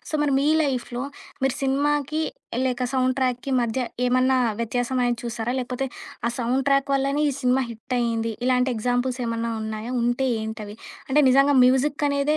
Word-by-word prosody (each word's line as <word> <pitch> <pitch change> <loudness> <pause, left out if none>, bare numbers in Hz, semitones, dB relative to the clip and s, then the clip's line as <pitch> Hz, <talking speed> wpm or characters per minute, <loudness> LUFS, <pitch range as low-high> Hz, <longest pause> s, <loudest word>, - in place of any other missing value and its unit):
So, - - -6
మరి 285 -2 +1
మీ 280 - +1 0.2
లైఫ్‌లో 250 -3 -2 0.4
మీరు 270 -1 +2
సినిమాకి 290 +3 +1 0.4
లేక 250 -1 0
సౌండ్ 255 -1 +2
ట్రాక్‌కి 255 0 -1
మధ్య 235 +2 -1 0.3
ఏమన్నా 255 +1 +3 0.2
వ్యత్యాసంనేది 245 +1 0
చూసారా? 235 0 -3
లేపోతే 250 +2 -3 0.4
ఆ - - -1
సౌండ్ 250 +3 0
ట్రాక్ 275 0 +2
వల్లనే 275 +2 +1
ఈ - - -3
సినిమా 255 +1 +2
హిటయింది. 230 0 -2
ఇలాంటి 255 0 +2
ఎగ్జాంపుల్స్ 245 +2 -1
ఏమన్నా 230 0 -2
ఉన్నాయా? 220 +3 -5
ఉంటే 240 +3 +1
ఏంటవి? 220 -1 -6 0.3
అంటే 295 +3 +4
నిజంగా 275 +2 +5
మ్యూజిక్ 280 +3 +2
అనేదే 280 +2 +1
255 Hz, 150 wpm, -24 LUFS, 240-275 Hz, 0.4 s, నిజంగా